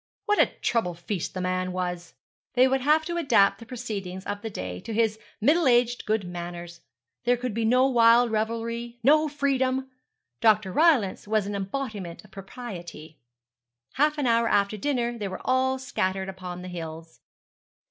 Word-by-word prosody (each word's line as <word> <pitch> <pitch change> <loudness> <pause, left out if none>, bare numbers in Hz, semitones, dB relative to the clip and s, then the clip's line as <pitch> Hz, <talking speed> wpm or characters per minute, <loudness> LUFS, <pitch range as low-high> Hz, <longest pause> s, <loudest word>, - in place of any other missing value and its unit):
What 415 0 +2
a - - +6
trouble 200 -7 -1
feast 175 +2 -4
the 185 - -2
man 185 0 -1
was. 180 -1 -4 0.4
They 255 +1 +6
would 265 0 +1
have 305 +4 +3
to 345 +1 -3
adapt 200 -11 +3
the 230 - -12
proceedings 200 -7 -6
of 205 0 -4
the 225 - -4
day 90 - -5
to 225 - -6
his 220 -1 +1 0.2
middle 300 +7 +3
aged 240 -1 +2
good 215 -1 +1
manners. 175 -1 -7 0.4
There 245 0 +3
could 245 -2 -3
be 225 +1 -1
no 250 +3 +4
wild 235 -1 +5
revelry, 230 +2 -2
no 305 +4 +5
freedom. 265 -2 0 0.5
Dr. 215 -3 +3
Rylance 265 - +3
was 215 -1 +1
an 205 - -4
embodiment 200 -3 -5
of 210 - -20
propriety. 180 -7 -9 0.7
Half 300 +2 +2
an 290 - -1
hour 230 -1 +3
after 200 -1 +2
dinner 240 0 -1
they 205 - -2
were 185 -1 -6
all 260 +1 +2
scattered 195 -8 -2
upon 180 -1 -7
the - - -7
hills. 165 -2 -8
220 Hz, 170 wpm, -26 LUFS, 185-255 Hz, 0.7 s, a